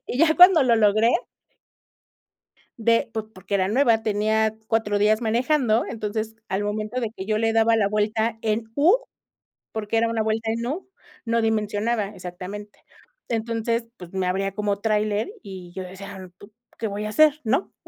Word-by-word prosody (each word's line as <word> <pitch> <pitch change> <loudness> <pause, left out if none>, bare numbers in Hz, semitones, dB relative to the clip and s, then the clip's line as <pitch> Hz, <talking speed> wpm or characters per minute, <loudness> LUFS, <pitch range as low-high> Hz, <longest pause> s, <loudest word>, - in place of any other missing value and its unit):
Y 245 - -4
ya 315 +1 +4
cuando 355 -4 +8
lo 235 -3 +3
logré, 215 +1 +4 1.7
de 230 +2 +2
po 220 -1 -5
porque 185 +1 -6
era 190 -1 +2
nueva, 230 -1 +3
tenía 220 +1 +1
4 220 -2 0
días 215 +2 +3
manejando, 240 0 +1
entonces 220 0 -4
al 190 +2 -1
momento 215 +4 -3
de 230 -3 -2
que 190 - -6
yo 215 0 0
le 225 0 +1
daba 225 0 +4
la 205 -3 +2
vuelta 215 +2 0
en 220 +1 0
U 330 +10 +5 0.8
porque 220 0 -2
era 230 +1 +3
una 230 -1 -1
vuelta 220 +1 -1
en 230 +1 -3
U 310 +10 -4 0.4
no 230 0 +1
dimensionaba 215 0 0
exactamente, 185 +4 -8 0.5
entonces 230 0 -1
pues 180 -1 -12
me 190 -1 -1
abría 195 +1 -1
como 205 0 -1
tráiler 210 - 0
y 185 -3 -10
yo 190 - -4
decía: 190 0 -9
"¿p - - -12 0.3
qué 225 - -2
voy 205 +1 -4
a - - -3
hacer, 305 +6 +4
no?" 260 - 0
220 Hz, 170 wpm, -24 LUFS, 205-230 Hz, 1.7 s, cuando